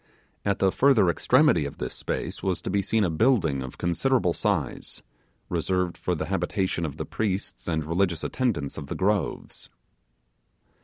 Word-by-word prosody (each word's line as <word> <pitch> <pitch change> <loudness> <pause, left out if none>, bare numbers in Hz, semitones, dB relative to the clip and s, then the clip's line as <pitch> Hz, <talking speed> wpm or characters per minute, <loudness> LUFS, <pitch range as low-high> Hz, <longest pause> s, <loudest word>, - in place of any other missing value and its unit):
At 100 -1 +1
the 95 -1 +3
further 115 -9 +4
extremity 75 - +3
of 70 - -6
this 65 - -4
space - - -4
was 95 -3 0
to - - -3
be 100 - +2
seen 110 +3 +1
a 90 - +2
building 80 - +2
of 65 -1 -7
considerable 90 +2 +1
size, 90 - -2 0.4
reserved 90 -2 0
for 90 - -2
the 80 - -3
habitation 95 -1 -1
of 70 - -8
the - - -4
priests 100 -3 -3
and 80 -3 -1
religious 85 0 0
attendants 90 - -1
of 70 - -8
the - - -4
groves. 100 -1 -1
90 Hz, 160 wpm, -26 LUFS, 80-100 Hz, 0.4 s, further